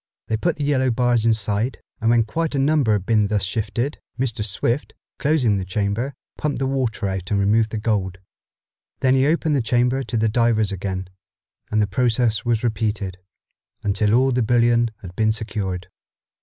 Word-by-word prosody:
They 110 - +1
put 165 +9 0
the 150 - -4
yellow 135 -2 +2
bars 120 -1 +2
inside, 110 +2 0 0.2
and 115 - +1
when 115 -1 +4
quite 160 +8 -2
a - - 0
number 135 -4 +3
had 100 -3 -1
been 105 -2 +3
thus 105 -1 0
shifted, 110 +7 -2 0.2
Mr. 120 -4 -1
Swift, 115 +6 -1 0.2
closing 130 -9 +2
the - - -3
chamber, 105 +7 -2 0.2
pumped 150 -2 -1
the 135 - -1
water 125 -5 -1
out 95 -1 -4
and 100 - +1
removed 110 +3 +3
the 110 - -4
gold. 100 -4 -1 0.8
Then 130 0 +4
he 135 +1 +3
opened 160 -1 +1
the 135 - +2
chamber 125 +3 +1
to 120 - -3
the 110 0 +2
divers 110 -2 +2
again, 95 -1 -4 0.6
and 110 -1 +2
the - - +2
process 115 +1 +1
was 120 -2 0
repeated, 105 -4 -2 0.6
until 105 +1 +2
all 130 +2 +3
the 125 0 +1
bullion 120 0 +3
had 90 -1 -9
been 110 -1 +2
secured. 100 -5 -3
115 Hz, 180 wpm, -22 LUFS, 105-125 Hz, 0.8 s, when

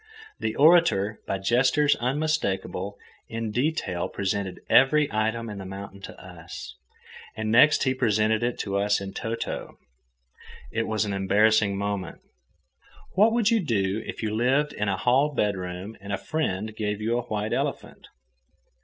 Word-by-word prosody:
The 110 - -2
orator, 145 - +4
by 95 - -1
gestures 130 +8 +3
unmistakable, 125 - -1 0.3
in 115 -1 -3
detail 125 - -1
presented 100 -1 -3
every 150 +3 +5
item 110 +2 -1
in 105 -2 -6
the - - -6
mountain 100 0 -8
to - - -10
us, - - -10 0.6
and 110 0 -2
next 150 +7 +6
he 130 - +2
presented 110 -3 +1
it 120 0 -1
to 100 -1 -1
us 105 +1 +2
in 95 0 -7
toto. 115 +1 -4 0.9
It 115 0 -1
was 110 -1 0
an 100 - -3
embarrassing 100 +1 +3
moment. 100 -3 -3 0.9
What 215 +4 +5
would 230 -1 +2
you 230 - +4
do 105 - 0
if - - -7
you 105 -1 -1
lived 135 +6 +1
in 105 -1 -1
a 95 - 0
hall 135 +6 +2
bedroom 95 -1 -2
and 100 0 -7
a 100 - 0
friend 110 -7 -3
gave 105 -1 -2
you 115 +2 0
a 120 - -7
white 105 0 -2
elephant? - - -3
110 Hz, 155 wpm, -26 LUFS, 100-130 Hz, 0.9 s, next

